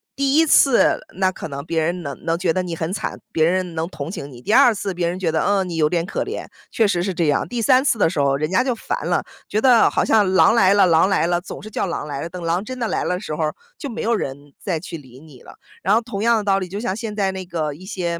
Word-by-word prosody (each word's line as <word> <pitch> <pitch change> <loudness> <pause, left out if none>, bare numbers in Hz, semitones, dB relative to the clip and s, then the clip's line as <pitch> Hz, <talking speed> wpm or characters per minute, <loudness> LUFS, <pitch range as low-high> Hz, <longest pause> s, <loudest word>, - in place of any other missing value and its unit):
第 275 0 +1
1 325 +1 +5
次， 275 -4 +4 0.2
那 190 0 +1
可 180 - -7
能 140 0 -6
别 165 0 -1
人 175 +2 -2
能 140 -2 -7
能 165 0 0
觉 175 -1 0
得 185 +3 0
你 175 -2 -4
很 165 +1 -3
惨， - - -4
别 160 -1 +2
人 180 -1 -1
能 160 +1 -2
同 140 -2 -7
情 145 -6 -7
你； 120 -2 -12
第 210 - 0
2 250 -3 +6
次， 200 -1 -4
别 175 -1 -1
人 180 +2 -3
觉 170 -4 0
得， 160 - 0
嗯， 200 -2 +1
你 170 - -5
有 155 -1 +3
点 170 0 0
可 195 - -3
怜， - - -5 0.3
确 220 -2 +2
实 180 -3 0
是 190 +1 -2
这 170 -3 0
样； 145 - +2
第 240 -1 -3
3 255 +3 +4
次 240 - +2
的 175 - +3
时 160 - -3
候 140 -1 +2
人 155 +3 -2
家 185 - +3
就 255 -2 -1
烦 - - -4
了， - - +1 0.2
觉 215 - 0
得 250 -3 +5
好 - - 0
像 205 -4 +3
狼 190 - +5
来 200 -4 +5
了 200 -2 +5
狼 165 +1 +4
来 195 - +2
了， 175 0 +1
总 180 - -9
是 215 - -8
叫 - - -1
狼 160 -3 -4
来 140 -1 -5
了， 170 - -5
等 180 +1 -8
狼 170 +3 0
真 255 +3 -6
的 235 -2 -2
来 - - -1
了 180 - -1
的 180 - -6
时 155 - -5
候 160 - -2
儿， 155 - -3 0.2
就 285 - -5
没 235 - -5
有 235 - +1
人 145 -5 -6
再 175 -5 -2
去 165 0 -7
理 130 -3 -15
你 145 -5 -16
了。 - - -14 0.3
然 200 +3 +3
后 230 - +3
同 225 -4 -6
样 235 -1 +4
的 215 - -2
道 195 -1 +2
理， 185 - -4
就 195 +3 -6
像 215 -4 -2
现 225 -2 -5
在 195 -2 0
那 190 -1 -6
个 160 -4 -3
一 180 +6 -13
些， 170 -3 -3
185 Hz, 320 characters per minute, -21 LUFS, 165-210 Hz, 0.3 s, 2